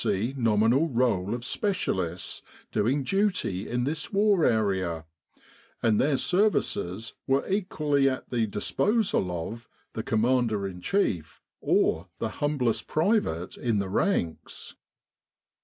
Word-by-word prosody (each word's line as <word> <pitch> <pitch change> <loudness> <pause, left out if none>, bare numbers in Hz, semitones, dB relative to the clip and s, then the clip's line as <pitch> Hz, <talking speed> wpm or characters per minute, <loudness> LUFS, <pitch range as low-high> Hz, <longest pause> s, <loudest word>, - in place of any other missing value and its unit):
C. 105 +7 0
Nominal 115 +5 +3
Roll 115 -5 +1
of 120 0 -7
Specialists 95 - -2 0.3
doing 130 +7 +1
duty 180 - 0
in 120 0 0
this 150 - -2
War 200 -3 +3
area, 95 -7 +1 0.8
and 110 -3 +3
their 140 0 +2
services 115 - 0
were 135 0 +1
equally 150 -8 +1
at 130 - -5
the 115 -3 +1
disposal 200 - +1 0.2
of 115 +1 -11 0.2
the 110 - -3
Commander 115 -2 +1
in 90 -2 -8
Chief 90 - -1 0.2
or 85 +4 +1
the 115 - -2
humblest 140 -6 0
private 155 - 0
in 115 -3 0
the 100 -1 -1
ranks. 95 - -2
120 Hz, 120 wpm, -27 LUFS, 100-155 Hz, 0.8 s, Nominal